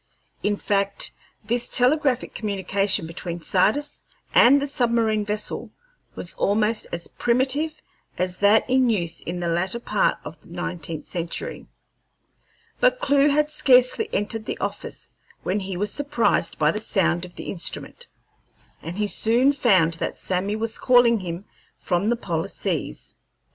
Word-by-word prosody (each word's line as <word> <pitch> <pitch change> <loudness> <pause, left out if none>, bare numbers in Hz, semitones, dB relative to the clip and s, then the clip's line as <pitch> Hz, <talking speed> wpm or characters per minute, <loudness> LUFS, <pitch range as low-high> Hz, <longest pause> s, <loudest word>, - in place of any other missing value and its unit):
In 205 0 0
fact, 200 -1 0 0.3
this 240 +2 0
telegraphic 260 0 +2
communication 195 -2 0
between 170 +1 -6
Sardis 215 - +1 0.3
and 270 +4 +7
the 280 - -1
submarine 230 -5 +1
vessel 210 0 -3 0.5
was 175 - -3
almost 215 +2 +1
as 170 0 -4
primitive 275 +6 0 0.4
as 180 0 -1
that 205 +2 +4
in 255 -1 +3
use 175 -7 -1
in 175 +1 -5
the 175 - -1
latter 180 +7 -1
part 210 -3 +1
of 155 0 -10
the - - -20
nineteenth 170 -2 -5
century. 180 - -5 1.1
But - - +3
Clewe 280 - +3
had 300 +1 +2
scarcely 280 - +4
entered 215 +1 -2
the - - -3
office - - -5 0.3
when 195 +3 0
he 190 -2 -5
was 205 +2 0
surprised 280 -11 +1
by 150 0 +3
the 210 - -3
sound 175 -5 +1
of 180 -1 -9
the - - -6
instrument, 340 - -6 0.7
and 170 +3 -7
he 210 - +1
soon 235 +7 +3
found 190 - +3
that - - -2
Sammy 190 +3 -1
was 220 0 -2
calling 245 -2 +5
to 185 - -8
him 170 +3 -5 0.3
from 185 +3 0
the 240 - +2
polar 170 -8 -3
seas. - - -4
210 Hz, 150 wpm, -23 LUFS, 180-250 Hz, 1.1 s, and